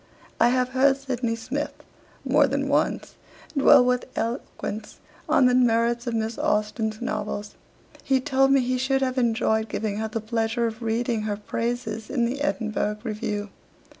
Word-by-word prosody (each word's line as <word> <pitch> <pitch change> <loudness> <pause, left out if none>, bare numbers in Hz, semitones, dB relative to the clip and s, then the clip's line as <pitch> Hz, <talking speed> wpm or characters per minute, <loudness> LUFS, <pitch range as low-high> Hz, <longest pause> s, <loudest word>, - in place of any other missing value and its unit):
'I 240 - +5
have 250 0 +1
heard 270 +1 +3
Sydney 250 -4 -2
Smith, 265 +6 -4 0.5
more - - +4
than - - -1
once, - - 0 0.4
dwell 270 -2 +7
with 250 0 +1
eloquence 225 -2 -4 0.3
on 265 - +5
the 250 - +4
merits 235 -1 +2
of 235 - -1
Miss 220 0 -2
Austen's 215 +1 0
novels. 205 -3 -3 0.5
He 265 -1 +2
told 270 +1 +2
me 275 -1 +5
he 255 +1 -1
should 270 +1 +1
have 255 0 0
enjoyed 220 -2 +1
giving 210 -1 -2
her 220 +1 -2
the 220 +1 -3
pleasure 225 +1 -1
of 225 0 -4
reading 230 0 0
her 205 - -2
praises 230 0 -3
in 240 -4 +1
the 265 +4 -3
"Edinburgh 215 -6 -1
Review." 210 -2 -3
235 Hz, 160 wpm, -25 LUFS, 220-255 Hz, 0.5 s, dwell